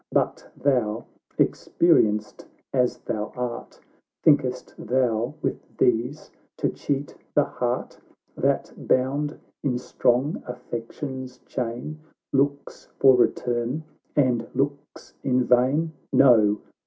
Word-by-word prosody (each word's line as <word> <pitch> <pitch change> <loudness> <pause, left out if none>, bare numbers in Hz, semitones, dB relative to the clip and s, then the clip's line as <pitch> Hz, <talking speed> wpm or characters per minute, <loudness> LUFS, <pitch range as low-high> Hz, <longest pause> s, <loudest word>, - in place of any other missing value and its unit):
But - - 0
thou, 120 -5 +1 0.3
experienced 105 -11 +2 0.3
as 125 -2 +2
thou 105 -2 -4
art, 125 -1 -5 0.4
Think'st 130 -5 +3
thou 120 +1 0
with - - -1 0.2
these 125 +5 +1 0.3
to - - +1
cheat 140 0 -3 0.2
the - - +6
heart, - - -3 0.4
That, - - 0
bound 140 +4 0 0.2
in 125 -3 0
strong 125 +3 +1
affection's 125 +2 -6
chain, 125 +5 -4 0.3
Looks 140 +1 0
for 135 -1 +7
return 125 +3 +1 0.3
and 125 -5 +2
looks 140 +2 -3
in 125 -1 +2
vain? 130 +7 +3 0.2
No 110 -6 +5
125 Hz, 100 wpm, -25 LUFS, 120-140 Hz, 0.4 s, for